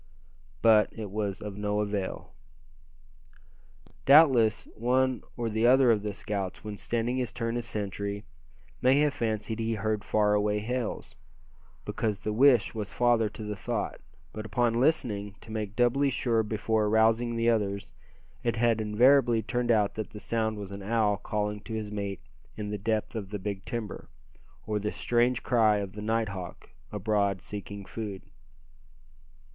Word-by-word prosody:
But 110 -2 +5
it 105 -4 -7
was 100 -1 -2
all 105 - -5
of 100 - -10
no 105 0 0
avail. 100 -5 -3 1.7
Doubtless 130 -7 +6
one 130 +2 +1 0.2
or 120 -1 -1
the 110 +1 +2
other 130 -1 +6
of 105 -2 +2
the 105 -1 -4
scouts, 100 -3 -4
when 105 -1 -5
standing 120 +4 -1
his 125 -4 -1
turn 115 0 -3
as 120 -1 -3
sentry, 100 -1 -4 0.6
may 130 +2 +5
have 150 -1 +2
fancied 110 -3 -2
he 115 0 0
heard 110 0 -1
far 105 -1 +2
away 105 0 +2
hails, 120 +2 -3 0.7
because 105 -3 -1
the 105 +1 -3
wish 125 -1 +5
was 105 -3 -5
father 120 -3 +2
to 110 - -9
the 105 0 -4
thought; 95 - -3 0.3
but 110 - -5
upon 115 +2 +1
listening, 115 -7 0
to 110 - -12
make 105 -2 -4
doubly 125 +4 +3
sure 120 -3 +1
before 110 0 0
arousing 110 +2 +3
the 115 0 +3
others, 100 -8 -1 0.5
it 120 -1 0
had 115 -1 +2
invariably 120 +2 +4
turned 120 +4 -1
out 105 -3 +3
that 110 -1 -5
the 105 - -9
sound 110 -1 -1
was 100 -1 -7
an 100 0 -7
owl 105 0 +1
calling 105 +1 -2
to 110 +2 -7
his 105 -1 -4
mate 100 -4 -4 0.4
in 105 -1 -4
the 105 - -3
depth 110 +1 -1
of 100 -4 -4
the 105 - -3
big 100 0 -5
timber, 110 - -5 0.6
or 105 0 -1
the 105 +1 -2
strange 120 +1 +1
cry 110 -4 +4
of 100 -2 -4
the 105 - -7
night 110 0 0
hawk 90 -6 -8 0.2
abroad 100 -2 0
seeking 100 0 -7
food. 105 -3 -6
110 Hz, 165 wpm, -28 LUFS, 105-115 Hz, 1.7 s, Doubtless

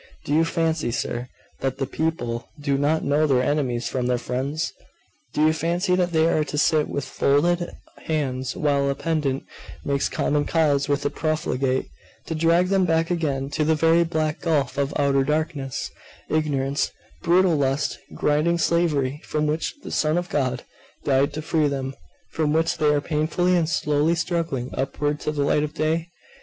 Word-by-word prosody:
Do 145 - -1
you 160 +2 +4
fancy, 165 -4 0
sir, 120 +1 -3 0.3
that 135 -1 -2
the 135 - -1
people 130 -5 -2
do 140 -1 0
not 145 +3 +1
know 150 +2 +2
their 130 -3 +3
enemies 130 -5 0
from 125 -2 -1
their 125 0 +2
friends? 135 +6 -2 0.6
Do 155 - +2
you 155 - +4
fancy 175 +4 +1
that 180 -1 +1
they 160 -1 +3
are 155 -2 +2
to 150 - -5
sit 150 0 +3
with 140 - -3
folded 170 +5 +1 0.4
hands, 130 -5 -1
while 140 -2 +1
a 140 - 0
pedant 145 -3 -1 0.4
makes 140 0 0
common 145 0 0
cause 145 -4 +2
with 145 -1 0
a 145 - +1
profligate, 135 -4 -1 0.4
to - - -3
drag 165 +3 +3
them 195 -1 +3
back 165 0 +1
again 150 -6 0
into 145 +3 -1
the 160 +1 +3
very 165 +2 +4
black 155 -2 -1
gulf 155 -6 0
of 140 +1 0
outer 140 -1 +3
darkness, 150 -2 -2 0.4
ignorance, 140 -3 0 0.3
brutal 180 0 +4
lust, 140 0 0 0.2
grinding 155 +4 +2
slavery, 150 -5 +1
from 150 0 -1
which 155 +1 -1
the - - -7
Son 155 +2 +1
of 175 0 -2
God 130 -3 -1 0.4
died 135 0 +2
to 155 - -5
free 155 -1 +2
them, 135 -1 -3 0.4
from 155 -2 0
which 165 +1 +1
they 150 - +3
are 145 -1 +2
painfully 160 +4 +1
and 165 -3 +1
slowly 150 +1 +1
struggling 165 -7 -2
upward 145 +2 -1
to - - -2
the 145 -2 -1
light 145 +1 +2
of 150 0 -3
day? 160 +2 0
150 Hz, 175 wpm, -24 LUFS, 140-165 Hz, 0.6 s, you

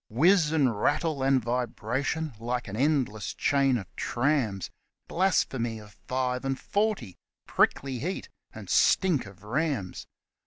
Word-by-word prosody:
Whiz 160 - +4
and 130 -9 +1
rattle 155 -5 +1
and 135 0 +3
vibration, 125 +5 -2
like 120 +1 -3
an 100 - -6
endless 125 -7 0
chain 135 -2 +2
of 95 -6 -9
trams; 120 - 0 0.4
Blasphemy 130 -11 0
of 105 -1 -12 0.2
five 125 0 -1
and 135 0 -2
forty 200 - -1 0.3
prickly 135 -2 +1
heat 180 +8 -3 0.3
and - - -9
stink 170 - +3
of 100 0 -15
rams 125 - -2
130 Hz, 125 wpm, -28 LUFS, 115-150 Hz, 0.4 s, Whiz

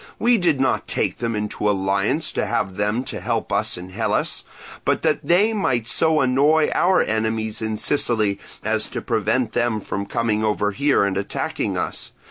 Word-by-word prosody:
We 240 -1 +3
did 165 -6 +2
not 135 - +1
take - - -1
them 115 -1 -1
into 105 0 -1
alliance 100 +10 0
to - - -1
have 95 -2 -1
them 105 +5 0
to - - -6
help 115 -2 -2
us 105 +1 0
in 90 +1 -9
Hellas, - - -1 0.4
but - - 0
that 155 -2 +1
they 180 +9 +3
might 125 - 0
so 155 +6 +3
annoy 145 +4 +3
our 180 +1 +3
enemies 110 0 -1
in 110 -1 -2
Sicily 110 -7 +1 0.2
as - - 0
to - - -5
prevent 125 -4 0
them 120 -3 0
from 100 0 -4
coming 110 -1 0
over 105 -1 +1
here 140 +2 +2
and 100 -1 0
attacking 100 - -2
us. - - -4
115 Hz, 175 wpm, -22 LUFS, 105-145 Hz, 0.4 s, We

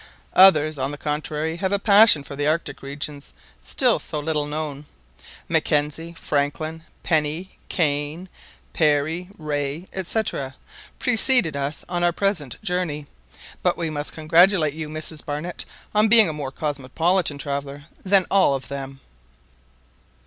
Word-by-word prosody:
Others, 155 -6 +6
on 135 +1 -1
the 145 - -5
contrary, 150 +2 -3
have 190 +2 -1
a 200 - +3
passion 200 -6 +6
for 140 - -8
the 145 +1 -1
Arctic 155 -2 -1
regions, 140 - -6 0.3
still - - +2
so 150 - -2
little 150 -1 -1
known. 150 -1 -5 0.6
Mackenzie, 150 +3 0
Franklin, 155 +2 -2 0.2
Penny, 160 +3 -1
Kane, 150 +2 -1 0.5
Parry, 155 +3 +1
Rae, 150 +1 -3
&c., 190 +4 0 0.8
preceded 245 - +3
us 140 +2 -3
on 175 -1 -2
our 175 - +4
present 175 - -2
journey; 175 -5 -2 0.6
but - - +1
we 165 -2 -2
must 145 -1 -4
congratulate 165 0 +4
you, 155 -1 -6
Mrs 155 0 -2
Barnett, 150 +4 -4 0.3
on 210 +1 +4
being 220 -1 +7
a 160 - -3
more 145 -3 -4
cosmopolitan 150 +4 0
traveller 140 0 -5 0.2
than 195 -1 +4
all 190 -8 +4
of 135 - -7
them." 135 -1 -7
155 Hz, 135 wpm, -23 LUFS, 145-175 Hz, 0.8 s, being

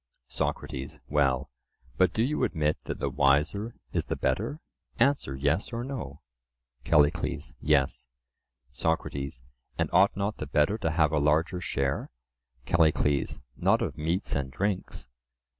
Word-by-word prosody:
SOCRATES: 70 -1 -3
Well, 70 -2 +1 0.4
but 95 - +4
do 110 - +1
you 150 +5 0
admit 75 -2 +1
that - - -4
the - - -2
wiser 75 +11 +2 0.2
is - - 0
the - - -2
better? 70 - -1 0.4
Answer 120 - +2
"Yes" 70 +8 0
or 120 0 -3
"No." 120 - -6 0.6
CALLICLES: 75 -2 +2
Yes. 70 -4 +1 0.6
SOCRATES: 70 -5 -2 0.3
And - - 0
ought - - +5
not 100 +2 -1
the 75 - -5
better 75 +9 +2
to 95 - 0
have 80 -2 +3
a 75 - +2
larger 80 +5 +2
share? 70 -4 -1 0.6
CALLICLES: 75 -4 +2
Not - - +3
of - - -3
meats 85 +6 -1
and 70 -2 -1
drinks. 95 -6 -2
75 Hz, 135 wpm, -28 LUFS, 70-95 Hz, 0.6 s, ought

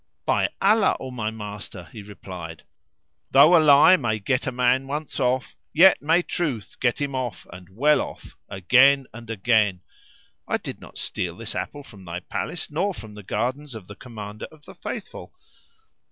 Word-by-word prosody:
"By - - +2
Allah, 210 +2 +3
O 130 - -7
my 110 -4 -3
master," 105 -4 -8
he 110 - -9
replied, 90 -5 -9 0.7
"though 150 +6 +7
a 165 - +6
lie 150 +5 +7
may 115 -7 -1
get 125 +6 -1
a - - 0
man 125 +1 +1
once 150 +2 -4
off, 125 -1 0 0.2
yet 185 +4 +7
may 165 +4 +3
truth 140 - -3
get 125 -1 +1
him 140 -1 -2
off, 130 -3 -4
and 90 0 -12
well 140 +10 +3
off, - - -9
again 130 +8 +4
and 115 0 -11
again. 110 -4 +1 0.7
I - - +1
did - - -8
not - - -12
steal - - -3
this - - -5
apple 145 - -5
from 100 -7 -15
thy 85 +1 -5
palace 165 - -5
nor 185 +6 -1
from 110 -6 -10
the 105 - -10
gardens 125 +7 -3
of 110 -4 -9
the 105 - -11
Commander 110 -3 -8
of 155 -2 -19
the - - -12
Faithful. - - -8
125 Hz, 175 wpm, -24 LUFS, 105-145 Hz, 0.7 s, though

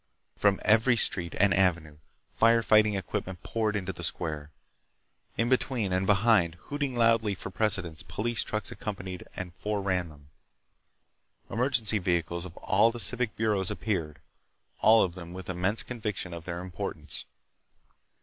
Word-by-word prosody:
From 100 -1 +2
every 115 +3 +4
street 85 -5 +1
and 100 +1 +5
avenue 85 -6 +1 0.4
fire 115 0 +4
fighting 110 -1 +4
equipment 95 -1 -4
poured 110 -2 -1
into 95 -2 -3
that 85 - -9
square. 75 -3 -3 0.9
In 115 - +1
between 120 -6 0
and 95 +1 0
behind, 100 -4 +3
hooting 140 +5 -4
loudly 115 -3 +3
for 95 - -7
precedence, 95 -6 0
police 105 +7 -2
trucks 110 -1 -3
accompanied 95 -5 -6
and 90 -2 -6
fore 105 +2 -3
ran 90 -3 0
them. 70 -2 -17 1.2
Emergency 115 -2 +3
vehicles 85 -1 -1
of 90 -2 -11
all 105 +4 +3
the 120 - -7
civic 125 -1 +1
bureaus 105 -4 +1
appeared, 80 -9 -3 0.6
all 110 0 +6
of 90 - -2
them 85 -1 -9
with 95 0 -6
immense 95 +5 0
conviction 105 -7 -4
of 85 -1 -8
their 85 -1 -4
importance. 90 -2 -4
95 Hz, 145 wpm, -28 LUFS, 90-110 Hz, 1.2 s, all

